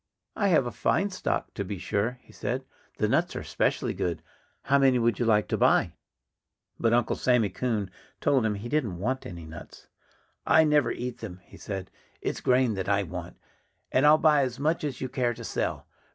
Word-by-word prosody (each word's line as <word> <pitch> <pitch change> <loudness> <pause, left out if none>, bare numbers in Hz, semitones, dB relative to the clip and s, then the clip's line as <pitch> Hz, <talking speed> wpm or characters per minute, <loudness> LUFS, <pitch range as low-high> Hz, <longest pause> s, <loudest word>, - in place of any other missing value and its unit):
"I 205 - +1
have 160 -8 +4
a 120 - -3
fine 200 +10 +1
stock, 185 - -2
to 100 - -3
be 100 +1 -5
sure," 105 +7 -1
he - - -19
said. - - -3 0.3
"The - - +1
nuts - - +1
are - - -4
specially - - 0
good. 85 -2 -3 0.4
How 140 +1 +3
many 135 -2 +4
would 115 -3 +1
you 120 - +1
like 105 -2 +3
to - - 0
buy?" - - +3 0.9
But 115 - +2
Uncle 120 -1 +2
Sammy 125 -5 +2
Coon 105 0 -2 0.3
told 135 -4 +2
him 110 -2 0
he 105 +4 -6
didn't 120 - -1
want 130 +8 -2
any 85 -3 -8
nuts. 80 0 -12 0.5
"I 160 +2 +5
never 150 -5 +3
eat 125 -1 -5
them," 95 -5 -7
he - - -15
said. 95 -2 -6 0.3
"It's - - -3
grain 125 -2 +3
that 95 -1 -3
I 100 0 +2
want. 90 0 -7 0.5
And 130 - +3
I'll 155 +1 +8
buy 150 -2 +4
as 130 -2 -2
much 155 +3 0
as 145 -4 -4
you 130 - -1
care 120 -2 -1
to 120 - -9
sell.... - - -2
120 Hz, 200 wpm, -27 LUFS, 100-135 Hz, 0.9 s, I'll